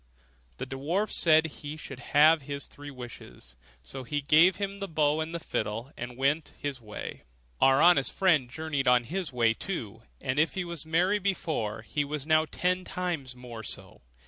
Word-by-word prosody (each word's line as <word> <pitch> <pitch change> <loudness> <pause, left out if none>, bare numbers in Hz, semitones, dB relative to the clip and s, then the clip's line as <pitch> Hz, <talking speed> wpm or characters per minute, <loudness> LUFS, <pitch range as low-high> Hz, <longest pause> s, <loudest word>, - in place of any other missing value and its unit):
The 130 - -4
dwarf 150 +11 -1
said 160 -1 +5
he 150 -1 -7
should 135 -4 -8
have 155 +3 +5
his 140 +1 -4
three 145 0 -11
wishes; 120 - -11 0.3
so 65 - -7
he 145 +4 -2
gave 155 +6 +5
him 200 0 -4
the 200 - -3
bow 155 -2 +2
and 165 +2 -3
fiddle, 115 -4 -3
and 125 0 -7
went 145 +4 0
his 140 -3 -4
way. 105 -2 -7 0.4
Our 135 +1 +6
honest 170 -6 +5
friend 155 -10 +3
journeyed 145 -1 -2
on 125 -1 +5
his 175 +5 -3
way 115 -2 +3
too; 115 - -5 0.2
and 130 +1 -1
if 160 - +2
he 190 -2 -2
was 170 -3 -6
merry 180 +6 +2
before, 155 - -2
he 145 +4 -1
was 145 0 -3
now 155 0 +4
ten 180 +1 0
times 170 -9 -3
more 120 -2 -9
so. - - -7
145 Hz, 175 wpm, -29 LUFS, 130-165 Hz, 0.4 s, Our